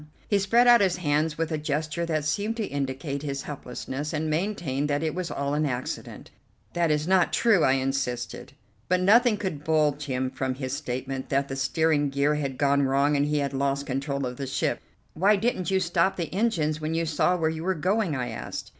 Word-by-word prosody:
He 205 Hz, -, +2 dB
spread 230 Hz, +5 st, +4 dB
out 240 Hz, -2 st, +7 dB
his 185 Hz, -3 st, +2 dB
hands 150 Hz, -1 st, 0 dB
with 165 Hz, 0 st, -2 dB
a 155 Hz, -, -1 dB
gesture 155 Hz, +3 st, -2 dB
that 155 Hz, -3 st, -1 dB
seemed 205 Hz, +9 st, -1 dB
to 220 Hz, -, -1 dB
indicate 140 Hz, 0 st, -3 dB
his 140 Hz, -2 st, -4 dB
helplessness, 140 Hz, +1 st, -5 dB
and 155 Hz, 0 st, -1 dB
maintained 155 Hz, -5 st, -1 dB
that 145 Hz, +2 st, 0 dB
it 155 Hz, -2 st, -1 dB
was 180 Hz, -1 st, -3 dB
all 140 Hz, 0 st, -2 dB
an 150 Hz, +1 st, +1 dB
accident. 125 Hz, -1 st, -5 dB, 0.4 s
"That 170 Hz, -1 st, +1 dB
is 150 Hz, +1 st, 0 dB
not 185 Hz, -1 st, +3 dB
true," 215 Hz, -8 st, +3 dB
I 130 Hz, -, +4 dB
insisted, 130 Hz, -2 st, -2 dB, 0.4 s
but 185 Hz, 0 st, +3 dB
nothing 220 Hz, +4 st, +5 dB
could 175 Hz, -8 st, -4 dB
budge 150 Hz, -2 st, +1 dB
him 130 Hz, -1 st, -2 dB
from 130 Hz, -1 st, -2 dB
his 130 Hz, -1 st, -4 dB
statement 130 Hz, -2 st, -4 dB
that 140 Hz, 0 st, 0 dB
the 135 Hz, -, -3 dB
steering 145 Hz, +2 st, +1 dB
gear 140 Hz, +2 st, +1 dB
had 140 Hz, -3 st, -3 dB
gone 140 Hz, 0 st, +3 dB
wrong 140 Hz, +2 st, +2 dB
and 145 Hz, +1 st, +2 dB
he 150 Hz, 0 st, 0 dB
had 140 Hz, -1 st, -1 dB
lost 140 Hz, +1 st, 0 dB
control 140 Hz, +1 st, -2 dB
of 125 Hz, 0 st, -5 dB
the 135 Hz, -, -4 dB
ship. 130 Hz, -, -1 dB, 0.3 s
"Why 200 Hz, +6 st, +4 dB
didn't 200 Hz, -3 st, -1 dB
you 190 Hz, 0 st, +2 dB
stop 175 Hz, +1 st, +1 dB
the 170 Hz, -2 st, -4 dB
engines 165 Hz, -8 st, 0 dB
when 155 Hz, +1 st, -2 dB
you 165 Hz, 0 st, 0 dB
saw 165 Hz, +3 st, +1 dB
where 160 Hz, -2 st, +1 dB
you 160 Hz, 0 st, -5 dB
were 190 Hz, +1 st, 0 dB
going?" 185 Hz, 0 st, 0 dB
I 125 Hz, -2 st, -2 dB
asked. 110 Hz, -, -6 dB
150 Hz, 210 wpm, -26 LUFS, 140-175 Hz, 0.4 s, out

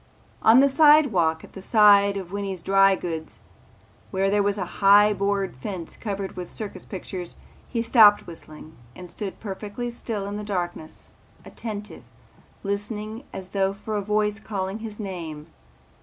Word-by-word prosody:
On 230 Hz, +4 st, +7 dB
the 280 Hz, -, +5 dB
sidewalk 270 Hz, -, +4 dB
at -, -, -14 dB
the 195 Hz, -, -9 dB
side 200 Hz, -1 st, +5 dB
of 185 Hz, -2 st, -7 dB
Winney's 195 Hz, -3 st, -4 dB
Dry 195 Hz, 0 st, +5 dB
Goods 165 Hz, -3 st, -5 dB
Store -, -, -18 dB, 0.7 s
where 195 Hz, 0 st, 0 dB
there 205 Hz, 0 st, +3 dB
was 200 Hz, 0 st, +1 dB
a 185 Hz, -, -2 dB, 0.2 s
high 205 Hz, +1 st, +7 dB
board 200 Hz, -2 st, -1 dB
fence 170 Hz, +5 st, -7 dB
covered 200 Hz, -3 st, -5 dB
with 180 Hz, -1 st, -7 dB
circus 200 Hz, -4 st, -6 dB
pictures, 185 Hz, -2 st, -7 dB, 0.3 s
he 230 Hz, -2 st, -1 dB
stopped 220 Hz, -3 st, +6 dB
whistling 160 Hz, -1 st, -11 dB, 0.2 s
and 180 Hz, -1 st, -10 dB
stood 200 Hz, -3 st, -6 dB
perfectly 210 Hz, +4 st, -5 dB
still 225 Hz, -4 st, -5 dB
in 200 Hz, +1 st, -4 dB
the 210 Hz, -, -5 dB
darkness, 175 Hz, -5 st, -5 dB, 0.3 s
attentive, 210 Hz, -2 st, -7 dB, 0.6 s
listening 210 Hz, +4 st, -4 dB
as 190 Hz, -1 st, -7 dB
though 195 Hz, 0 st, 0 dB
for 210 Hz, +2 st, -6 dB
a 205 Hz, -, 0 dB
voice 210 Hz, +1 st, 0 dB
calling 200 Hz, -1 st, -4 dB
his 220 Hz, -1 st, -8 dB
name. 170 Hz, -7 st, -6 dB
200 Hz, 155 wpm, -24 LUFS, 190-210 Hz, 0.7 s, On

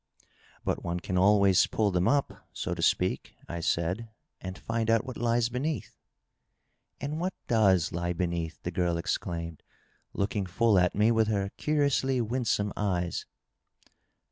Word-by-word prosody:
'^ -, -, -29 dB, 0.4 s
But -, -, -1 dB
one 85 Hz, +1 st, -2 dB
can 90 Hz, +1 st, -4 dB
always 100 Hz, 0 st, +5 dB
pull 105 Hz, -2 st, +1 dB
them 90 Hz, 0 st, +1 dB
up, 140 Hz, 0 st, 0 dB
so -, -, -3 dB
to -, -, -5 dB
speak," -, -, +1 dB
I 85 Hz, -, -4 dB
said, 85 Hz, +2 st, 0 dB
^^ 115 Hz, 0 st, -9 dB, 0.3 s
and 95 Hz, 0 st, -6 dB
find 115 Hz, -1 st, -2 dB
out 115 Hz, +1 st, +3 dB
what 130 Hz, -2 st, -6 dB
lies 115 Hz, 0 st, +1 dB
beneath," 140 Hz, +5 st, -3 dB, 0.5 s
" -, -, -49 dB
And 150 Hz, +2 st, -3 dB
what 185 Hz, +2 st, -2 dB
doea 95 Hz, -8 st, +3 dB
lie 85 Hz, +1 st, -2 dB
beneath 85 Hz, -1 st, -2 dB
?" -, -, -46 dB
the 90 Hz, -, -3 dB
girl 85 Hz, -1 st, 0 dB
exclaimed, 85 Hz, -1 st, -3 dB, 0.5 s
looking 100 Hz, -1 st, -1 dB
full 105 Hz, +1 st, +3 dB
at 90 Hz, 0 st, +2 dB
me 105 Hz, +3 st, +4 dB
with 110 Hz, -1 st, +3 dB
her 100 Hz, -2 st, 0 dB
curiously 140 Hz, -3 st, +1 dB
winsome 115 Hz, -3 st, 0 dB
eyes. 90 Hz, -4 st, -1 dB
100 Hz, 165 wpm, -29 LUFS, 90-115 Hz, 0.5 s, always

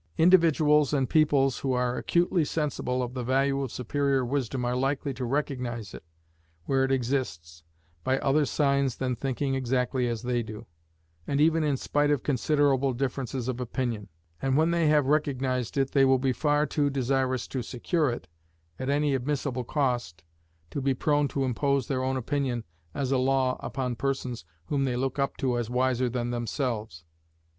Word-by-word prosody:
Individuals 160 Hz, -4 st, +4 dB
and 135 Hz, -3 st, 0 dB
peoples 145 Hz, -4 st, +3 dB
who 135 Hz, -2 st, -1 dB
are 125 Hz, 0 st, 0 dB
acutely 175 Hz, +2 st, +1 dB
sensible 145 Hz, -4 st, -1 dB
of 125 Hz, 0 st, -5 dB
the 125 Hz, -1 st, -3 dB
value 135 Hz, +2 st, +1 dB
of 135 Hz, -4 st, -3 dB
superior 135 Hz, +1 st, 0 dB
wisdom 130 Hz, -1 st, -2 dB
are 120 Hz, +1 st, 0 dB
likely 135 Hz, +2 st, -1 dB
to 130 Hz, 0 st, -5 dB
recognize 125 Hz, -, -3 dB
it, -, -, -9 dB, 0.6 s
where 135 Hz, +4 st, +2 dB
it 135 Hz, -, 0 dB
exists, 115 Hz, -, -2 dB, 0.4 s
by 130 Hz, 0 st, +1 dB
other 140 Hz, +3 st, +2 dB
signs 140 Hz, -2 st, +1 dB
than 125 Hz, -1 st, -2 dB
thinking 135 Hz, +2 st, -2 dB
exactly 130 Hz, -1 st, 0 dB
as 115 Hz, -1 st, -3 dB
they 120 Hz, -1 st, 0 dB
do, 110 Hz, -2 st, -8 dB, 0.6 s
and 140 Hz, -, 0 dB
even 160 Hz, +1 st, +4 dB
in 145 Hz, -3 st, +1 dB
spite 145 Hz, +2 st, +1 dB
of 145 Hz, -4 st, +1 dB
considerable 140 Hz, -1 st, +2 dB
differences 130 Hz, -1 st, -3 dB
of 130 Hz, -1 st, -2 dB
opinion; 120 Hz, -4 st, -3 dB, 0.3 s
and 135 Hz, 0 st, +1 dB
when 160 Hz, +2 st, +3 dB
they 170 Hz, -2 st, +2 dB
have 150 Hz, -2 st, +4 dB
recognized 130 Hz, -4 st, 0 dB
it 135 Hz, -1 st, +1 dB
they 135 Hz, -, +4 dB
will 135 Hz, 0 st, +5 dB
be 130 Hz, 0 st, 0 dB
far 150 Hz, +2 st, +2 dB
too 145 Hz, 0 st, 0 dB
desirous 130 Hz, -1 st, 0 dB
to 130 Hz, -, -3 dB
secure 145 Hz, -, 0 dB
it, 120 Hz, -, -5 dB, 0.5 s
at 130 Hz, +1 st, -3 dB
any 145 Hz, 0 st, +2 dB
admissible 130 Hz, -1 st, -1 dB
cost, 120 Hz, -, -1 dB, 0.5 s
to 140 Hz, -, -3 dB
be 135 Hz, 0 st, +1 dB
prone 145 Hz, +2 st, +2 dB
to 135 Hz, 0 st, -2 dB
impose 140 Hz, +1 st, 0 dB
their 130 Hz, -2 st, -1 dB
own 130 Hz, 0 st, 0 dB
opinion 130 Hz, -2 st, -1 dB, 0.3 s
as 135 Hz, -2 st, -1 dB
a 135 Hz, -, +3 dB
law 130 Hz, 0 st, +2 dB
upon 125 Hz, -3 st, -3 dB
persons 130 Hz, -5 st, -3 dB, 0.2 s
whom 140 Hz, -2 st, 0 dB
they 130 Hz, -2 st, 0 dB
look 130 Hz, +2 st, -2 dB
up 140 Hz, -, -1 dB
to 125 Hz, -3 st, 0 dB
as 120 Hz, -1 st, -3 dB
wiser 125 Hz, 0 st, +1 dB
than 120 Hz, 0 st, -2 dB
themselves. 115 Hz, -, -3 dB
135 Hz, 175 wpm, -27 LUFS, 125-140 Hz, 0.6 s, will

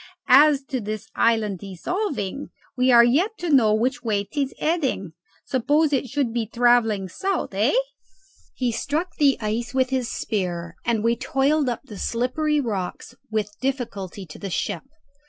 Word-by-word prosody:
As 285 Hz, +1 st, +7 dB
to 260 Hz, -1 st, -3 dB
this 215 Hz, +1 st, -5 dB
island 215 Hz, -5 st, +1 dB
dissolving, 275 Hz, -, -3 dB, 0.3 s
we 255 Hz, 0 st, +3 dB
are 235 Hz, -1 st, +8 dB
yet 335 Hz, -, +2 dB
to 345 Hz, -2 st, -3 dB
know 240 Hz, -7 st, +5 dB
which 255 Hz, +6 st, 0 dB
way 210 Hz, -4 st, 0 dB
'tis 275 Hz, +5 st, -2 dB
heading. 275 Hz, -, -1 dB, 0.3 s
Suppose 290 Hz, +4 st, +2 dB
it 265 Hz, -1 st, +1 dB
should 270 Hz, -4 st, -1 dB
be 235 Hz, -2 st, -1 dB
travelling 230 Hz, -4 st, +3 dB
south, 380 Hz, -, -2 dB
hey!" 210 Hz, -, +2 dB, 0.8 s
He 250 Hz, -2 st, 0 dB
struck 295 Hz, +10 st, -2 dB
the 280 Hz, -2 st, +4 dB
ice 230 Hz, +3 st, -3 dB
with 260 Hz, 0 st, +2 dB
his 255 Hz, -3 st, -1 dB
spear, 175 Hz, -4 st, -3 dB
and 230 Hz, -2 st, +1 dB
we 230 Hz, +1 st, +3 dB
toiled 275 Hz, +3 st, +1 dB
up 240 Hz, -, -3 dB
the 210 Hz, -8 st, -10 dB
slippery 295 Hz, +6 st, 0 dB
rocks 205 Hz, -9 st, -4 dB, 0.2 s
with 215 Hz, -2 st, -2 dB
difficulty 225 Hz, -8 st, -4 dB
to 155 Hz, -, -12 dB
the 195 Hz, -, -5 dB
ship. -, -, -2 dB
240 Hz, 155 wpm, -23 LUFS, 215-275 Hz, 0.8 s, are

